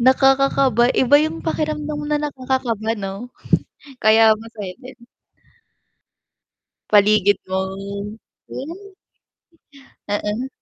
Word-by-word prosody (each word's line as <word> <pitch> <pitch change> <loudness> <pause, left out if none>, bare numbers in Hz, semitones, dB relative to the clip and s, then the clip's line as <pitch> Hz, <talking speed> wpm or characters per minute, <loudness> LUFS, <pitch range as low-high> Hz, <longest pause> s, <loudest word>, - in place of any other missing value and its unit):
nakakakaba. 265 -1 +4
Iba 260 +3 +4
'yung 315 +1 -3
pakiramdam 305 -1 -2
na 300 - +2
nakakakaba 255 -6 -2
'no? 195 +5 -6 0.7
Kaya 220 0 +6
masaya 215 -3 -8
din. 255 0 -12 1.9
Paligid 205 -1 +4
mo. 190 0 -1 0.9
Oh. 365 +9 -8 1.2
Oo. 210 +4 -2
245 Hz, 80 wpm, -20 LUFS, 215-275 Hz, 1.9 s, Kaya